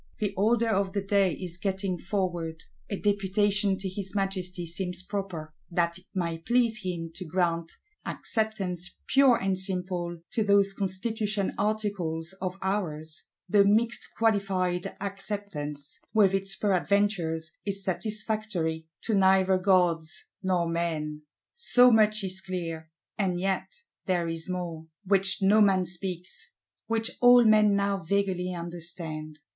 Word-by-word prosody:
The 205 Hz, -2 st, -1 dB
order 225 Hz, +4 st, +2 dB
of 195 Hz, -2 st, 0 dB
the 200 Hz, -1 st, -1 dB
day 195 Hz, -3 st, +2 dB
is 180 Hz, +1 st, -6 dB
getting 190 Hz, -1 st, -1 dB
forward: 175 Hz, -4 st, -3 dB, 0.3 s
a 200 Hz, -, -2 dB
Deputation 205 Hz, 0 st, +1 dB
to 195 Hz, -, -5 dB
his 190 Hz, +1 st, -5 dB
Majesty 185 Hz, -3 st, -2 dB
seems 180 Hz, +1 st, -3 dB
proper, 185 Hz, -6 st, -5 dB, 0.2 s
that 170 Hz, 0 st, 0 dB
it 185 Hz, -, -23 dB
might 170 Hz, -3 st, -2 dB
please 240 Hz, -2 st, +2 dB
him 170 Hz, -3 st, -4 dB
to 185 Hz, -, -6 dB
grant 170 Hz, -1 st, -1 dB, 0.3 s
"Acceptance 195 Hz, -6 st, -2 dB
pure 270 Hz, -2 st, +5 dB
and 190 Hz, -1 st, +1 dB
simple" 180 Hz, -2 st, 0 dB
to 220 Hz, -, +1 dB
those 200 Hz, -1 st, +4 dB
Constitution 205 Hz, +1 st, -1 dB
Articles 200 Hz, -6 st, -2 dB
of 185 Hz, 0 st, -3 dB
ours; 160 Hz, -5 st, -3 dB, 0.2 s
the 200 Hz, +2 st, +5 dB
"mixed 225 Hz, +4 st, +2 dB
qualified 195 Hz, -5 st, 0 dB
Acceptance," 195 Hz, -8 st, -4 dB, 0.2 s
with 200 Hz, -3 st, +5 dB
its 195 Hz, 0 st, +1 dB
peradventures, 190 Hz, -5 st, +1 dB
is 200 Hz, -1 st, -3 dB
satisfactory 195 Hz, -5 st, -2 dB, 0.2 s
to 225 Hz, -, -1 dB
neither 190 Hz, -1 st, +4 dB
gods 175 Hz, -4 st, +1 dB, 0.2 s
nor 180 Hz, -3 st, +1 dB
men. 160 Hz, -3 st, -2 dB, 0.3 s
So 250 Hz, -, +6 dB
much 215 Hz, -1 st, +4 dB
is 190 Hz, 0 st, -2 dB
clear. 165 Hz, -4 st, -5 dB, 0.3 s
And 185 Hz, -3 st, 0 dB
yet 190 Hz, +1 st, -1 dB, 0.4 s
there 175 Hz, -2 st, +1 dB
is 165 Hz, +1 st, -4 dB
more, 170 Hz, -3 st, -4 dB, 0.2 s
which 195 Hz, 0 st, +2 dB
no 210 Hz, +3 st, +5 dB
man 190 Hz, -3 st, +4 dB
speaks, 180 Hz, -, -6 dB, 0.3 s
which 225 Hz, 0 st, 0 dB
all 245 Hz, -1 st, +8 dB
men 215 Hz, -2 st, +5 dB
now 200 Hz, 0 st, +1 dB
vaguely 185 Hz, 0 st, -1 dB
understand. 170 Hz, -3 st, -5 dB
190 Hz, 130 wpm, -28 LUFS, 175-205 Hz, 0.4 s, all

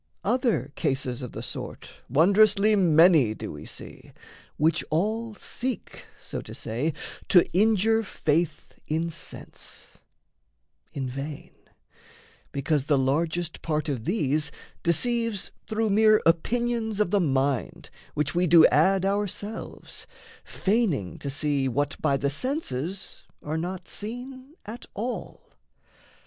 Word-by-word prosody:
Other 210 Hz, -, +1 dB
cases 130 Hz, -4 st, -1 dB
of 125 Hz, -, -7 dB
the -, -, -6 dB
sort -, -, -6 dB, 0.2 s
Wondrously 200 Hz, -, +5 dB
many 160 Hz, -, +5 dB
do -, -, -6 dB
we -, -, -9 dB
see, -, -, -11 dB, 0.4 s
which 160 Hz, +2 st, +2 dB
all 215 Hz, +7 st, -1 dB
Seek, 250 Hz, +3 st, -5 dB
so -, -, -6 dB
to -, -, -10 dB
say, 140 Hz, +8 st, -2 dB, 0.3 s
to 180 Hz, -, +6 dB
injure 220 Hz, +2 st, +4 dB
faith 165 Hz, -5 st, -1 dB
in 165 Hz, +2 st, -1 dB
sense -, -, -9 dB, 0.9 s
In 135 Hz, -2 st, -3 dB
vain, 140 Hz, +3 st, -6 dB, 1.0 s
because 140 Hz, 0 st, 0 dB
the 145 Hz, -2 st, +3 dB
largest 160 Hz, +5 st, 0 dB
part 155 Hz, -1 st, -1 dB
of 125 Hz, -6 st, -3 dB
these 150 Hz, -6 st, 0 dB, 0.3 s
Deceives 230 Hz, +4 st, +1 dB, 0.2 s
through 220 Hz, -1 st, +1 dB
mere 215 Hz, +1 st, +6 dB
opinions 220 Hz, +5 st, +1 dB
of 210 Hz, -4 st, +2 dB
the 205 Hz, -, +4 dB
mind, 135 Hz, -4 st, 0 dB, 0.2 s
Which 150 Hz, -1 st, 0 dB
we 175 Hz, +1 st, +2 dB
do 165 Hz, 0 st, +8 dB
add 190 Hz, +5 st, +3 dB
ourselves, 205 Hz, +2 st, -3 dB, 0.4 s
feigning 190 Hz, -, 0 dB
to 140 Hz, -, -4 dB
see 145 Hz, -1 st, 0 dB
What 145 Hz, +3 st, 0 dB
by 140 Hz, -, +2 dB
the 140 Hz, +1 st, 0 dB
senses 190 Hz, -, -3 dB, 0.2 s
are 150 Hz, +1 st, -3 dB
not 180 Hz, +3 st, -4 dB
seen 255 Hz, +6 st, -6 dB
at 220 Hz, +4 st, -8 dB
all. 240 Hz, +4 st, -5 dB
170 Hz, 120 wpm, -26 LUFS, 145-215 Hz, 1.0 s, do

